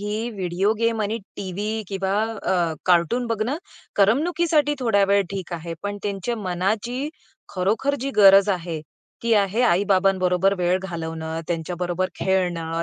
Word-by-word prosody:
ही 210 +3 -2
video 190 0 0
game 230 -1 +1
आणि 215 +3 -2 0.2
TV 205 +3 -3
किंवा 195 -1 -2 0.3
अ, 175 -3 +1
cartoon 185 +8 +3
बघणं 230 +5 -1 0.4
करमणुकीसाठी 300 - +2
थोड्या 205 -5 +3
वेळ 200 - +4
ठीक 190 -3 -5
आहे. 170 0 -5
पण 205 0 -3
त्यांच्या 200 +3 -2
मनाची 210 +8 -2 0.5
खरोखर 215 +10 +1
जी 275 +2 -2
गरज 195 -1 +7
आहे, 170 -4 -3 0.4
ती 230 0 +1
आहे 200 +2 +2
आई-बाबांबरोबर 190 -2 +3
वेळ 180 +1 +2
घालवणं, 160 -2 -4
त्यांच्याबरोबर 175 +2 -2
खेळणं, 170 -3 -1
195 Hz, 130 wpm, -23 LUFS, 180-220 Hz, 0.5 s, गरज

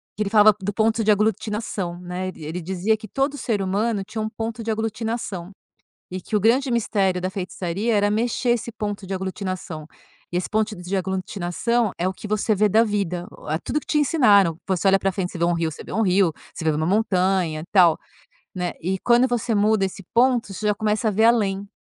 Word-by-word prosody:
que 215 - -1
ele 200 - -3
falava 210 -1 +6
do 205 +2 -2
ponto 225 +1 +1
de 215 - +4
aglutinação 210 -3 -1
né, 180 +1 -4
ele 165 -4 -8
ele 170 +3 -4
dizia 190 +5 0
que 215 0 -10
todo 275 +5 -1
ser 215 -6 -1
humano 200 +2 0
tinha 220 +3 -5
um 215 - -2
ponto 225 +1 -5
de 225 - -1
aglutinação, 220 -4 -3 0.6
e 185 +1 -4
que 215 - -4
o - - +4
grande 250 +6 +3
mistério 195 -5 +1
da 185 - -1
feitiçaria 190 +3 -2
era 205 0 +3
mexer 235 +2 0
esse 235 0 -1
ponto 205 -3 -4
de 195 - -3
aglutinação, 185 -4 -4 0.5
e 175 - 0
esse 180 - -2
ponto 215 0 0
de 180 +1 -4
aglutinação 190 +4 -1
é 180 - 0
o 190 - -1
que 210 - -9
você 215 +1 +1
vê 210 +2 +3
da 225 +4 +5
vida, 185 -5 -2 0.4
tudo 300 - -1
que - - -18
te 300 - 0
ensinaram, 205 - +4
você 190 0 +1
olha 195 0 +5
para 195 - 0
frente 180 -1 -3
você - - -7
vê 170 - -1
um 175 - +2
rio 165 -1 -1
você - - -9
vê - - -8
um 225 - +1
rio, 185 -4 +3 0.2
você - - -7
vê 155 - +4
uma 155 +1 -1
montanha 185 -5 +1
tal, 175 -5 +5 0.6
né, 180 -1 -2
e 190 +3 -1
quando 240 +2 +4
você 240 -2 -1
muda 210 -1 +3
esse 190 +1 -7
ponto 240 -4 +2
você 210 +3 -3
já 210 - +3
começa 215 +1 0
a - - +2
ver 220 +3 +3
além. 205 -4 +2
205 Hz, 215 wpm, -23 LUFS, 185-220 Hz, 0.6 s, falava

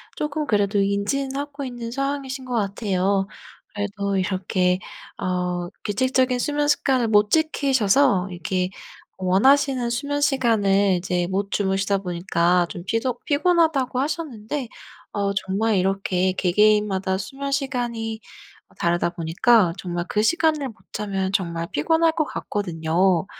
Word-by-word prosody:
쪼끔 300 0 -2
그래도 205 -1 +2
인지는 205 +8 -1
하고 285 0 -5
있는 240 -2 -6
상황이신 275 -1 -3
것 250 - -5
같아요. 195 -2 0 0.5
그래도 200 -1 -2
이렇게 185 -1 0 0.4
어 180 -1 -2 0.2
규칙적인 255 +4 +1
수면 295 +2 0
습관을 260 -5 +2
못 210 -1 +4
지키셔서 270 - +2
이렇게 180 +1 -2 0.5
원하시는 250 +6 +3
수면 285 +4 -2
시간을 205 -8 +3
이제 175 -1 -1
못 195 +1 -2
주무시다 195 0 0
보니까 175 -1 +1
좀 175 -4 -7
피조 235 +4 -1
피곤하다고 300 -5 +2
하셨는데 280 -4 -3 0.5
어 200 -1 0
정말 195 +3 0
이렇게 185 -1 +1
개개인마다 195 0 +2
수면 275 +8 -5
시간이 240 -5 -2 0.5
어 - - -23
다르다 170 0 0
보니까 175 +3 +3
정말 175 -1 -4
그 210 - +1
시간을 310 -1 +2
못 220 - -13 0.2
자면 195 -2 -2
정말 170 -3 -1
피곤할 325 0 +2
것 310 -2 0
같거든요. 175 - 0
205 Hz, 300 characters per minute, -23 LUFS, 190-265 Hz, 0.5 s, 못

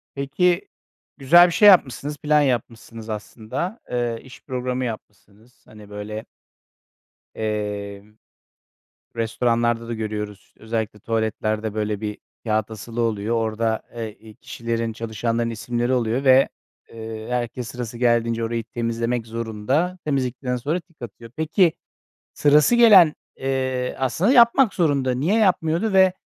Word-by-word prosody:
Peki, 170 +7 0 0.5
güzel 170 +6 +7
bir 175 - -3
şey 210 +4 +6
yapmışsınız, 145 - +4
plan 150 +1 +3
yapmışsınız 115 -3 -3
aslında. 110 - -5
Eee, 120 -2 -1
iş 130 -1 -14
programı 125 0 -3
yapmışsınız. 110 0 -10
Hani, 105 -1 -14
böyle, 105 +2 -6 1.1
eee, 105 -2 -4 1.1
restoranlarda 115 0 0
da 120 - -3
görüyoruz. 105 -2 -4
İşte, - - -30
özellikle 110 -1 -3
tuvaletlerde 110 -1 -2
böyle 105 -1 -2
bir 105 -1 -4 0.3
kâğıt 110 -1 0
asılı 115 +3 -6
oluyor. 115 0 0
Orada 110 0 -1
e 115 -2 -5
i 110 0 -16
kişilerin, 115 0 -4
çalışanların 115 +1 -2
isimleri 120 +2 -2
oluyor 120 +2 0
ve, 130 0 +6 0.4
eee, 110 -1 -7
herkes 120 0 -3
sırası 120 -1 -6
geldiğince 115 -1 +1
orayı 115 0 -2
temizlemek 115 0 -2
zorunda. 115 - -2
Temizledikten 130 -3 -1
sonra 150 +9 -2
tik 170 -5 -24
atıyor. 115 0 -9
Peki, 160 +2 +2 0.6
sırası 150 +9 +4
gelen, 205 -10 +7 0.2
eee, 130 -1 -2
aslında 160 - +1
yapmak 235 -1 +5
zorunda. 140 -7 +1
Niye 155 - 0
yapmıyordu 185 0 +1
ve 190 -1 +5
120 Hz, 125 wpm, -22 LUFS, 110-140 Hz, 1.1 s, güzel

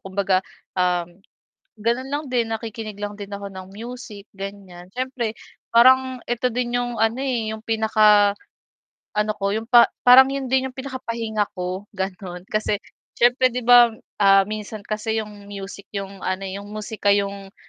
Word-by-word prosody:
kumbaga, 190 -1 0 0.3
um, 180 -1 -1 0.6
gano'n 235 +5 -1
lang 290 +2 -2
din 245 -4 0
nakikinig 220 -1 -5
lang 205 0 -4
din 205 -1 -9
ako 200 -1 -7
ng 185 0 -9
music 220 -1 -9
ganiyan. 195 -2 -9
Siyempre 245 -1 -3 0.3
parang 260 +2 +5
ito 240 +1 0
din 240 0 -2
yung 245 -1 -4
ano, 225 +3 +1
eh, 235 -5 -1
yung 220 - -8
pinaka 215 -2 +4 0.8
ano 210 0 +1
ko 200 0 0
yung 225 +2 -4
pa 240 -1 +8 0.2
parang 255 +1 +9
'yun 270 -2 -4
din 265 0 +2
yung 260 - -8
pinakapahinga 230 -5 -3
ko 185 +1 -4
gano'n. 190 -2 -5
Kasi, 215 -1 -1 0.3
syempre 245 +2 +4
'di 250 - -2
ba, 240 -1 +7 0.2
ah, 195 -1 +6
minsan 215 0 -6
kasi 220 +1 -2
yung 205 -1 -12
music 200 0 -8
yung 195 0 -5
ano, 185 +1 -1
eh, 195 0 -5
yung 200 - -9
musika 210 -1 0
yung 200 -1 -3
215 Hz, 160 wpm, -22 LUFS, 200-240 Hz, 0.8 s, parang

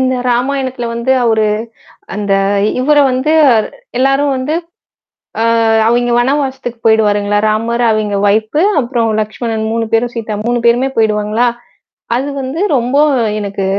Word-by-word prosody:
இந்த 260 0 +1 0.2
ராமாயணத்தில 260 0 -1
வந்து 235 +3 0
அவரு, 220 -2 +2 0.7
அந்த 200 -1 -2 0.5
இவர 295 +3 +2 0.2
வந்து 260 +5 0 0.7
எல்லாரும் 275 +1 +2
வந்து 270 +5 -2 0.9
ஆ - - +2 0.4
அவெங்க 240 +1 +1
வனவாசத்துக்கு 265 -1 -1
போயிடுவாருங்களா! 205 -2 +2
ராமர் 230 +3 -1
அவெங்க 215 -2 0
ஒயிப் 215 +7 0 0.2
அப்புறம் 235 -3 -1
லஷ்மணன் 220 +1 -3
3 230 0 -1
பேரும் 235 +1 +1
சீதா 225 -2 -4
3 240 0 0
பேருமே 240 +3 +3
போயிடுவாங்களா! 215 +1 +1 0.7
அது 265 +4 -1
வந்து 265 +6 -4 0.2
ரொம்ப 250 +2 -1 0.4
எனக்கு 200 -1 -4
235 Hz, 120 wpm, -14 LUFS, 220-260 Hz, 0.9 s, பேருமே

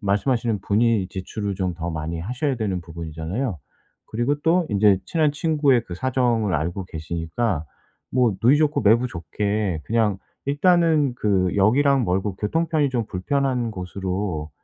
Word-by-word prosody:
말씀하시는 110 +2 0
분이 105 -2 +2
지출을 100 +2 -4
좀 90 -2 -2
더 85 +1 -4
많이 80 +1 -4
하셔야 125 - -2
되는 100 -5 -2
부분이잖아요. 85 - -4 0.5
그리고 120 +6 0
또 170 +3 +3
인제 100 -2 +4
친한 155 -3 +1
친구의 145 -4 +2
그 85 - -7
사정을 120 -3 +1
알고 85 +6 -2
계시니까 80 +3 -3 0.5
뭐 120 -5 +2
누이 125 +6 +6
좋고 150 0 +2
매부 115 +4 +4
좋게 100 0 -2
그냥 110 -4 +1 0.3
일단은 155 -2 +3
그 95 -5 +1
역이랑 130 +7 +3
멀고 95 +1 -1
교통편이 155 +5 0
좀 125 -3 -1
불편한 125 +5 -1
곳으로 90 -3 -4
105 Hz, 315 characters per minute, -23 LUFS, 90-130 Hz, 0.5 s, 누이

